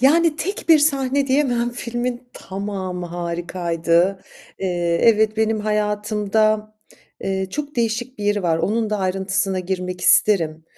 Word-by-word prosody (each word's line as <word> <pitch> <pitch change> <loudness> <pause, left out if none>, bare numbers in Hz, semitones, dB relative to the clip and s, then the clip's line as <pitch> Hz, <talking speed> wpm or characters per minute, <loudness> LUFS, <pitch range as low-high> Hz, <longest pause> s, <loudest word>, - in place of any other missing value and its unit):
yani, 310 +4 +4
tek 390 +4 -4
bir 320 -2 +8
sahne 275 -2 +1
diyemem. 255 -3 +1
Filmin 240 +1 -4
tamamı 190 -2 -5
harikaydı. 170 +1 0 0.4
Eee, 175 -2 0
evet 220 -1 +4
benim 220 0 +1
hayatımda, 210 0 0 0.5
eee, 190 0 -2
çok 295 +2 -5
değişik 235 +2 -1
bir 205 - -4
yeri 205 -1 +1
var. 165 -2 +1
Onun 220 +4 0
da 210 - 0
ayrıntısına 190 0 -1
girmek 180 0 -4
isterim. 160 -6 +3
210 Hz, 130 wpm, -21 LUFS, 185-240 Hz, 0.5 s, bir